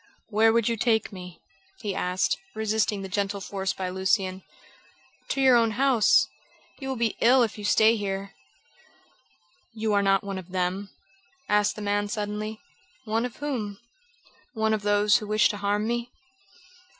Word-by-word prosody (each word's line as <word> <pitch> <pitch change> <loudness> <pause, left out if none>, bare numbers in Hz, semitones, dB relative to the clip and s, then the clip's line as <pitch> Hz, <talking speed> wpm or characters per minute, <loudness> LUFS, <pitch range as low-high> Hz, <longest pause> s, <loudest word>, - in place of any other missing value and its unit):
"Where 220 +1 +4
would 230 -1 +2
you 230 -1 0
take 220 0 +1
me?" 180 -2 -10 0.4
he 205 -4 -2
asked, 180 0 0 0.2
resisting 215 -2 0
the - - -5
gentle 200 +1 -2
force 195 0 -4
used - - -2
by 185 -1 -3
Lucian. 190 0 0 0.9
"To - - -2
your 260 -2 +6
own 230 -2 +3
house. 260 -5 +4 0.5
You 270 -1 -5
will 265 - -2
be 230 -2 -1
ill 250 +2 +6
if 220 - -2
you 210 - -9
stay 220 +2 +4
here." 195 -2 -4 1.4
"You 220 -1 -1
are 200 - +3
not 195 0 +2
one 195 -1 -4
of 185 -1 -12
them?" 185 +2 -2 0.6
asked 210 0 +2
the 210 - -7
man 205 0 0
suddenly. 210 +1 -4 0.5
"One 225 +2 0
of 245 - -6
whom?" 230 -9 -4 0.8
"One 220 0 +1
of 215 - -1
those 205 0 +3
who 210 - -7
wish 215 0 +3
to 205 - -3
harm 205 +1 0
me?" 240 +1 -2
210 Hz, 165 wpm, -26 LUFS, 195-225 Hz, 1.4 s, your